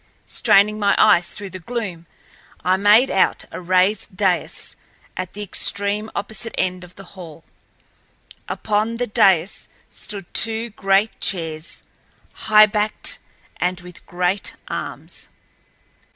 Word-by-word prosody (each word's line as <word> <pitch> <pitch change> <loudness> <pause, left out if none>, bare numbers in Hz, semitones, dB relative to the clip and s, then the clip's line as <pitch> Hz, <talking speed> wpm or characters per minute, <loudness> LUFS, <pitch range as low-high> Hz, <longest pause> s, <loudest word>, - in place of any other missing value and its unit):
Straining 210 +2 +3
my 200 -1 +3
eyes 175 0 +5
through 200 -2 -6
the 185 - -7
gloom, 185 -4 -5 0.6
I 185 +2 +3
made 210 +6 +5
out 190 - +2
a - - -7
raised 185 +2 +1
dais 185 -3 -1 0.4
at 185 -1 -5
the 210 - -5
extreme 205 +2 -2
opposite 220 +3 -4
end 185 0 -1
of 180 0 -14
the 195 - -11
hall. 165 -4 -11 1.1
Upon 215 +2 -1
the 245 - 0
dais 195 -4 +2 0.2
stood 200 -4 -8
two 225 +1 0
great 195 +1 +1
chairs, 160 -3 -3 0.6
highbacked 215 0 +3 0.4
and 180 0 -1
with 180 -1 -12
great 180 +1 0
arms. - - -7
195 Hz, 120 wpm, -21 LUFS, 180-210 Hz, 1.1 s, eyes